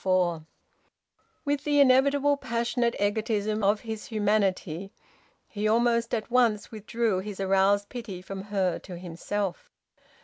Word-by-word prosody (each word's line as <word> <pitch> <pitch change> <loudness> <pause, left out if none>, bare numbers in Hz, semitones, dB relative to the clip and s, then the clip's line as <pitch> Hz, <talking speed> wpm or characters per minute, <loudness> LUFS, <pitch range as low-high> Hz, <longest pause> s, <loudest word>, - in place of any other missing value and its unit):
FOUR. 180 -4 +1 1.0
With 290 -1 0
the 290 -1 +2
inevitable 280 +2 +4
passionate 235 -2 -1
egotism 210 +1 0
of 205 +2 +2
his 220 -2 -6
humanity 200 -4 0 0.6
he 210 0 -2
almost 235 +1 +2
at 220 +1 -5
once 235 -4 +2
withdrew 220 -2 -1
his 200 0 -7
aroused 195 +1 +2
pity 230 -7 -7
from 190 +1 -7
her 195 -4 0
to 180 -2 -9
himself. 180 +3 -4
210 Hz, 125 wpm, -27 LUFS, 195-235 Hz, 1.0 s, inevitable